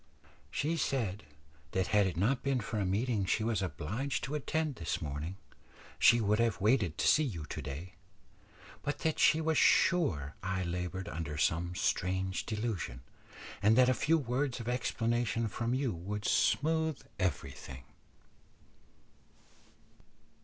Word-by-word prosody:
"She 160 Hz, +3 st, -1 dB
said 115 Hz, -, -1 dB, 0.5 s
that 95 Hz, 0 st, 0 dB
had 105 Hz, -2 st, +5 dB
it 90 Hz, -, -4 dB
not 120 Hz, +8 st, +2 dB
been 135 Hz, -2 st, +1 dB
for 110 Hz, 0 st, -3 dB
a 100 Hz, -, 0 dB
meeting 105 Hz, +2 st, 0 dB
she 95 Hz, +4 st, +1 dB
was 110 Hz, -3 st, 0 dB
obliged 100 Hz, -, -3 dB
to 135 Hz, +4 st, -4 dB
attend 150 Hz, -1 st, -1 dB
this 85 Hz, -, -2 dB
morning, 75 Hz, +5 st, -5 dB, 0.6 s
she 120 Hz, -, +6 dB
would 105 Hz, 0 st, +2 dB
have 115 Hz, -2 st, +1 dB
waited 105 Hz, -, +2 dB
to -, -, +1 dB
see 155 Hz, -, +6 dB
you 90 Hz, -, -4 dB
to -, -, -6 dB
day; 80 Hz, +7 st, -7 dB, 0.9 s
but 145 Hz, -, -2 dB
that 160 Hz, -, +1 dB
she 155 Hz, -, +5 dB
was 160 Hz, -1 st, +2 dB
sure 115 Hz, -, +3 dB
I 95 Hz, -1 st, -2 dB
laboured 90 Hz, +1 st, -3 dB
under 80 Hz, -2 st, -4 dB
some 85 Hz, +3 st, 0 dB
strange 95 Hz, +1 st, -1 dB
delusion, 105 Hz, -, -3 dB, 0.6 s
and 105 Hz, +3 st, +4 dB
that 130 Hz, 0 st, +6 dB
a -, -, +4 dB
few 160 Hz, +7 st, +2 dB
words 130 Hz, -1 st, -1 dB
of 115 Hz, -, -6 dB
explanation 120 Hz, -2 st, 0 dB
from 115 Hz, +3 st, -2 dB
you 130 Hz, -4 st, 0 dB
would 100 Hz, +5 st, -5 dB
smooth 160 Hz, 0 st, +2 dB, 0.2 s
everything." 70 Hz, -6 st, -3 dB
105 Hz, 145 wpm, -32 LUFS, 90-130 Hz, 0.9 s, she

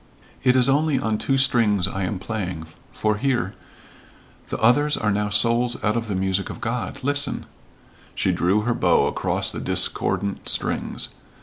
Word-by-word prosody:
"It 125 Hz, -1 st, +4 dB
is 125 Hz, -1 st, +4 dB
only 145 Hz, +1 st, +2 dB
on 110 Hz, -4 st, -1 dB
two 135 Hz, -, +1 dB
strings 115 Hz, -8 st, +3 dB
I 95 Hz, -, -4 dB
am 95 Hz, +2 st, -2 dB
playing 90 Hz, -5 st, -4 dB, 0.3 s
for 105 Hz, -1 st, 0 dB
hear? 120 Hz, -6 st, 0 dB, 1.0 s
the -, -, -2 dB
others 145 Hz, +6 st, +3 dB
are 105 Hz, -1 st, 0 dB
now 105 Hz, +1 st, 0 dB
souls 115 Hz, +4 st, +3 dB
out 105 Hz, +1 st, +1 dB
of 115 Hz, -1 st, -2 dB
the 100 Hz, -, -2 dB
music 95 Hz, +1 st, 0 dB
of -, -, -7 dB
God 115 Hz, -3 st, -3 dB
listen 145 Hz, 0 st, -1 dB, 0.3 s
" -, -, -28 dB
she 95 Hz, -, +1 dB
drew 90 Hz, +4 st, +2 dB
her 120 Hz, +3 st, 0 dB
bow -, -, +3 dB
across -, -, -1 dB
the -, -, -5 dB
discordant 100 Hz, -1 st, -1 dB
strings. -, -, -1 dB
110 Hz, 170 wpm, -23 LUFS, 100-125 Hz, 1.0 s, It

